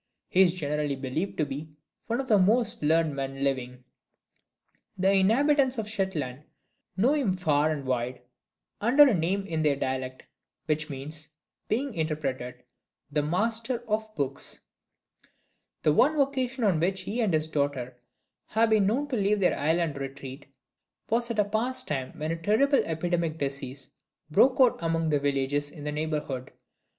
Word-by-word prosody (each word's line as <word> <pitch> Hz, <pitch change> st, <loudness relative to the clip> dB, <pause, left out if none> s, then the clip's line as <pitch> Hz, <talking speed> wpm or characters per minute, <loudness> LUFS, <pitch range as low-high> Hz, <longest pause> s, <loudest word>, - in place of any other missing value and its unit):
He 185 Hz, -, +4 dB
is 180 Hz, -2 st, +5 dB
generally 150 Hz, -3 st, -1 dB
believed 135 Hz, +8 st, -3 dB
to 155 Hz, -, +1 dB
be 150 Hz, +2 st, -7 dB, 0.3 s
one 235 Hz, +2 st, -1 dB
of 270 Hz, -, -3 dB
the 215 Hz, -5 st, +5 dB
most 225 Hz, +4 st, +2 dB
learned 155 Hz, 0 st, +2 dB
men 135 Hz, 0 st, -4 dB
living. 125 Hz, -2 st, -2 dB, 1.1 s
The 190 Hz, +1 st, +3 dB
inhabitants 260 Hz, +7 st, +3 dB
of 220 Hz, -2 st, -3 dB
Shetland 160 Hz, -, -2 dB, 0.6 s
know 240 Hz, +9 st, +4 dB
him 235 Hz, -12 st, +1 dB
far 155 Hz, -4 st, +2 dB
and 145 Hz, -3 st, -3 dB
wide, 125 Hz, 0 st, -2 dB, 0.6 s
under 270 Hz, +7 st, +7 dB
a 255 Hz, -, +3 dB
name 190 Hz, +3 st, 0 dB
in 160 Hz, -5 st, -2 dB
their 150 Hz, -2 st, +3 dB
dialect 130 Hz, -1 st, -3 dB, 0.4 s
which 155 Hz, 0 st, -1 dB
means, 150 Hz, +3 st, -5 dB, 0.4 s
being 260 Hz, +4 st, -1 dB
interpreted, 145 Hz, -6 st, -3 dB, 0.5 s
"The 150 Hz, +1 st, +1 dB
Master 225 Hz, -, -1 dB
of 220 Hz, 0 st, -1 dB
Books." 140 Hz, -1 st, -4 dB, 1.3 s
The 150 Hz, -, +4 dB
one 300 Hz, -, +3 dB
occasion 265 Hz, -2 st, 0 dB
on 190 Hz, -7 st, +3 dB
which 185 Hz, +3 st, 0 dB
he 205 Hz, +6 st, -2 dB
and 215 Hz, -4 st, +2 dB
his 155 Hz, -1 st, +1 dB
daughter 140 Hz, -5 st, -2 dB, 0.5 s
have 225 Hz, +1 st, +2 dB
been 210 Hz, -3 st, +4 dB
known 265 Hz, +8 st, 0 dB
to 260 Hz, -, -1 dB
leave 205 Hz, -1 st, +2 dB
their 185 Hz, -, +3 dB
island 160 Hz, 0 st, 0 dB
retreat 135 Hz, 0 st, -7 dB, 0.6 s
was 235 Hz, +1 st, +1 dB
at 230 Hz, -, -3 dB
a 210 Hz, -, +3 dB
past 245 Hz, +5 st, -1 dB
time 135 Hz, -4 st, -3 dB
when 155 Hz, +1 st, -2 dB
a 165 Hz, 0 st, -4 dB
terrible 270 Hz, -, +3 dB
epidemic 165 Hz, 0 st, -1 dB
disease 135 Hz, -2 st, -4 dB, 0.4 s
broke 255 Hz, -, +4 dB
out 255 Hz, -3 st, +5 dB
among 165 Hz, -1 st, 0 dB
the 145 Hz, -2 st, +2 dB
villages 140 Hz, +1 st, 0 dB
in 150 Hz, -1 st, -11 dB
the 150 Hz, -, -2 dB
neighborhood. 150 Hz, -4 st, -3 dB
160 Hz, 160 wpm, -27 LUFS, 140-220 Hz, 1.3 s, under